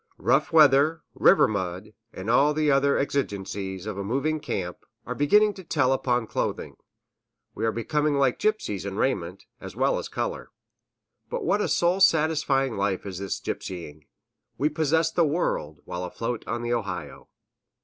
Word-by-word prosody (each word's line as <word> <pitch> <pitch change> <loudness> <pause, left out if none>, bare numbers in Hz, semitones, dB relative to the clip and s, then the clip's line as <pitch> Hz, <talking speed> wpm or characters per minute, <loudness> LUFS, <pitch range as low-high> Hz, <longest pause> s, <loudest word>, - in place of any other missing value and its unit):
Rough - - +1
weather, 155 +1 +5
river 195 - +5
mud, 95 0 -4 0.2
and 95 -1 -8
all 140 +6 +4
the 155 -1 +2
other 140 +1 +3
exigencies 100 -8 -3
of 105 -2 -5
a - - -2
moving 140 +9 -1
camp, 90 -11 -4 0.3
are - - -3
beginning 210 +9 +4
to 190 - -11
tell 140 -6 +1
upon 125 -3 0
clothing; - - -3 0.8
we 115 - -2
are - - +2
becoming 150 +6 0
like 135 -2 +2
gypsies 430 +1 -1
in - - -5
raiment, - - -2
as - - -9
well - - +1
as - - -6
color. - - -4 0.8
But 485 -4 -3
what 210 - +2
a - - 0
soul 175 +2 +2
satisfying 150 - +2
life 100 -1 -1
is 95 -2 -6
this 100 -2 -3
gypsying! 80 -5 -6 0.5
We 150 - +1
possess 160 +1 +1
the 170 - +2
world, 110 - -1
while 90 0 -5
afloat 115 +6 -4
on 120 +1 -3
the 120 0 -1
Ohio! 100 -6 -5
135 Hz, 160 wpm, -25 LUFS, 100-155 Hz, 0.8 s, weather